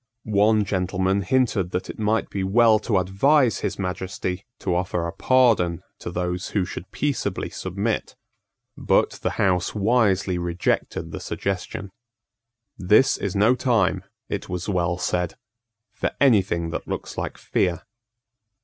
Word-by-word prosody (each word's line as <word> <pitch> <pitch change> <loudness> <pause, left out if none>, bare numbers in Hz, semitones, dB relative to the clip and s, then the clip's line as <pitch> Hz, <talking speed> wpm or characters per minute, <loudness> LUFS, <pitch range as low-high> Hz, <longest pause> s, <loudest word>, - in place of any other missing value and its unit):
One 105 0 +3
gentleman 95 0 0
hinted 105 -3 +1
that 90 - -2
it - - -8
might 110 +1 0
be 95 - -2
well 110 +3 +5
to 105 - +4
advise 115 - +3
his - - -3
Majesty 90 0 -4
to 90 - -2
offer 90 -1 -1
a 85 - -4
pardon 110 -10 +3 0.2
to - - -6
those 90 +1 -2
who 95 - +2
should 90 -1 -7
peaceably 135 -10 -2
submit: 100 +4 -3 0.6
but - - +2
the - - -2
House 90 -1 +1
wisely 100 -4 +2
rejected 85 0 -1
the - - -5
suggestion. 100 0 -4 0.9
"This 105 +7 +4
is 100 -1 -3
no 105 +5 +5
time," 120 -6 +1 0.2
it - - -4
was 90 0 -4
well 90 -3 0
said, 90 -1 -1 0.6
"for - - -1
any 125 -8 +6
thing 85 -3 -3
that - - -5
looks - - -5
like - - -4
fear." 90 -1 -1
95 Hz, 140 wpm, -24 LUFS, 90-110 Hz, 0.9 s, any